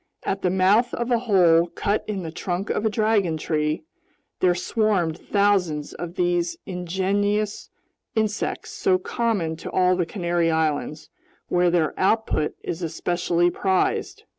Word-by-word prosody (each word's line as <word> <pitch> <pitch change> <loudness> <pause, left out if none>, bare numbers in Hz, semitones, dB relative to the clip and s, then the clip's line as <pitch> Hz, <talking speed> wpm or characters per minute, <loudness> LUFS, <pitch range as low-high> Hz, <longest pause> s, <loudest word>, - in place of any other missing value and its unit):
At 195 0 -2
the 180 - +1
mouth 195 +6 +3
of 240 +1 -3
a 240 - +3
hole 175 -7 +4
cut 205 +4 -1
in 200 -3 -3
the 160 - -5
trunk 180 +4 -3
of 220 - 0
a - - +2
dragon 210 -6 +1
tree, 155 - -1 0.6
there 180 -1 +3
swarmed 185 -4 0
thousands 190 -8 +1
of 175 +1 -7
these 175 -2 0
ingenious 195 +3 -1 0.5
insects 215 -1 -1
so 185 - +2
common 185 -5 -1
to - - -7
all 185 0 +3
the 175 -2 -1
Canary 175 -2 0
Islands, 155 -1 -1 0.4
where 180 0 +3
their 170 -3 +1
output 195 -5 +1
is 170 - -4
especially 175 +1 0
prized. 190 0 0
180 Hz, 140 wpm, -24 LUFS, 170-205 Hz, 0.6 s, hole